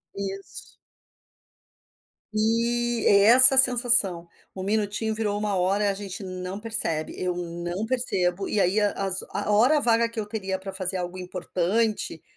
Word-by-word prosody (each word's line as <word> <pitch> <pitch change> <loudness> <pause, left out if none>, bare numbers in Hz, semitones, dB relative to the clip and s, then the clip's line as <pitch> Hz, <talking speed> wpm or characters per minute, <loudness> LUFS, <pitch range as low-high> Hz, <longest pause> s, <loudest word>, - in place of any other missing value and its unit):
Isso. 195 0 -7 1.6
E 235 +2 -1
é 200 0 +4
essa 260 +4 +8
a - - -1
sensação. 240 -9 +5 0.3
1 185 - -7
minutinho 215 +1 -2
virou 210 -2 -3
1 210 - -4
hora, 200 +1 -1
a - - -2
gente 195 0 -8
não 185 +1 -7
percebe, 210 -9 +2
eu 180 -1 -4
não 175 +3 -6
percebo, 195 -7 -2
e 210 - -1
aí 195 +3 +1
a 205 -1 0
as 190 -1 0
a 205 +1 -4
hora 250 +9 +3
vaga 230 -2 +1
que 230 - -8
eu 210 - -4
teria 195 -3 -5
pra 190 0 -10
fazer 190 0 -2
algo 180 +1 -7
importante, 185 +1 -3
200 Hz, 155 wpm, -23 LUFS, 185-225 Hz, 1.6 s, essa